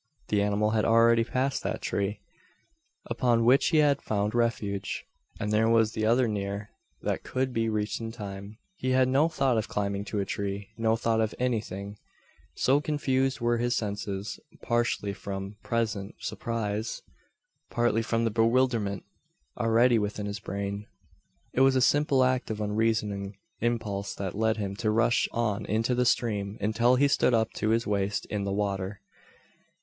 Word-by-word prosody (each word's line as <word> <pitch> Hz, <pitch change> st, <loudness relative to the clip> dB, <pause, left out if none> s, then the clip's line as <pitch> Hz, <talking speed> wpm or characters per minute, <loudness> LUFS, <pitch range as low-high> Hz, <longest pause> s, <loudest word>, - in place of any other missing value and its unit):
The 105 Hz, -1 st, +2 dB
animal 105 Hz, +1 st, +1 dB
had 110 Hz, -1 st, +1 dB
already 115 Hz, 0 st, +5 dB
passed 130 Hz, +3 st, -1 dB
that -, -, -3 dB
tree, 100 Hz, +1 st, -2 dB, 0.8 s
upon 120 Hz, -2 st, +1 dB
which 130 Hz, +3 st, +5 dB
he 160 Hz, -, +2 dB
had 145 Hz, -2 st, +4 dB
found 105 Hz, 0 st, -1 dB
refuge, 105 Hz, -5 st, -1 dB, 0.3 s
and 105 Hz, -1 st, -2 dB
there 110 Hz, +1 st, +3 dB
was 115 Hz, -1 st, +4 dB
t'other 115 Hz, +4 st, +2 dB
near 100 Hz, 0 st, -3 dB, 0.3 s
that -, -, -1 dB
could 130 Hz, 0 st, -2 dB
be 115 Hz, -1 st, 0 dB
reached 105 Hz, +1 st, -2 dB
in 115 Hz, 0 st, -4 dB
time. 100 Hz, -2 st, -8 dB, 0.2 s
He 130 Hz, -4 st, 0 dB
had 130 Hz, 0 st, +4 dB
no 140 Hz, +5 st, +3 dB
thought 135 Hz, -7 st, +1 dB
of 110 Hz, -, -3 dB
climbing 100 Hz, -1 st, -2 dB
to 105 Hz, -, -3 dB
a 100 Hz, -, 0 dB
tree 100 Hz, +1 st, -4 dB
no 115 Hz, 0 st, +2 dB
thought 115 Hz, 0 st, +1 dB
of 110 Hz, -1 st, -1 dB
any 125 Hz, -3 st, +1 dB
thing, 100 Hz, 0 st, -8 dB, 0.6 s
so 140 Hz, +3 st, +3 dB
confused 135 Hz, -3 st, 0 dB
were 120 Hz, 0 st, +1 dB
his 120 Hz, +1 st, +1 dB
senses 100 Hz, -1 st, -3 dB, 0.2 s
partly 120 Hz, -4 st, 0 dB
from 100 Hz, +1 st, -6 dB
present 110 Hz, -4 st, -2 dB
surprise, 110 Hz, -1 st, -3 dB, 0.7 s
partly 120 Hz, -1 st, +1 dB
from 115 Hz, 0 st, 0 dB
the 115 Hz, -, +1 dB
bewilderment 115 Hz, -3 st, +1 dB, 0.5 s
already 115 Hz, 0 st, +3 dB
within 105 Hz, 0 st, -3 dB
his 100 Hz, 0 st, -4 dB
brain. 100 Hz, +1 st, -4 dB, 0.7 s
It 130 Hz, -, +2 dB
was 135 Hz, 0 st, +5 dB
a -, -, +4 dB
simple 140 Hz, 0 st, +3 dB
act 130 Hz, 0 st, +1 dB
of 110 Hz, -1 st, -3 dB
unreasoning 105 Hz, -2 st, -1 dB, 0.2 s
impulse 110 Hz, -4 st, -2 dB
that 95 Hz, -2 st, -4 dB
led 110 Hz, +1 st, +1 dB
him 100 Hz, -2 st, -3 dB
to 110 Hz, -, 0 dB
rush 115 Hz, +2 st, +2 dB
on 110 Hz, -3 st, -1 dB
into 115 Hz, +4 st, +1 dB
the 125 Hz, 0 st, +2 dB
stream, 105 Hz, -4 st, 0 dB
until 115 Hz, +4 st, +3 dB
he 140 Hz, +3 st, +4 dB
stood 125 Hz, -3 st, +3 dB
up 110 Hz, -1 st, +1 dB
to 110 Hz, -, 0 dB
his 115 Hz, +1 st, +2 dB
waist 100 Hz, 0 st, -1 dB
in 105 Hz, -2 st, -1 dB
the 100 Hz, -, -2 dB
water. 100 Hz, 0 st, -2 dB
110 Hz, 165 wpm, -28 LUFS, 100-120 Hz, 0.8 s, already